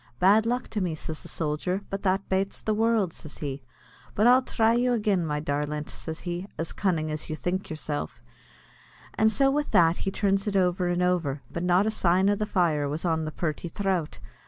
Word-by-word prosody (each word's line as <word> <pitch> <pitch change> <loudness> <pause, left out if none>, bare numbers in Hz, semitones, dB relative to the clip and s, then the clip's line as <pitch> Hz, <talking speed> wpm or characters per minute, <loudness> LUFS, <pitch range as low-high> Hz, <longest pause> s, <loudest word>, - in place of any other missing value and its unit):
"Bad 210 - +4
luck 245 +1 -1
to 210 - -2
me," 175 -4 -1
says 155 0 -6
the - - -10
sojer, 165 +5 -2
"but 195 0 -3
that 195 0 0
bates 195 +1 -1
the 215 - +1
world," 220 -5 +2
says 155 - -9
he; 140 -2 -4 0.5
"but 210 - +3
I'll 250 +2 +7
thry 225 -3 +2
you 245 +1 +2
agin, 210 -5 +1
my 150 -1 -1
darlint," 150 0 -2
says 160 0 -7
he, 175 +2 -4
"as 165 - -4
cunnin' 165 -6 0
as 155 0 -5
you 155 - -2
think 180 +4 -3
yourself;" 150 - -4 0.9
and 220 0 +3
so 270 +4 +3
with 295 +1 0
that 165 0 +4
he - - -2
turns 195 0 0
it 200 - -1
over 180 -1 +2
and 175 0 +1
over, 165 -6 0
but 170 - -4
not 180 +3 +3
a 220 - +1
sign 190 -1 +3
of 205 - +1
the 215 - -1
fire 160 -8 +1
was 155 +5 -3
on 160 -2 +1
the 155 - -4
purty 155 +1 -3
throut. 185 -2 -2
180 Hz, 210 wpm, -27 LUFS, 155-205 Hz, 0.9 s, I'll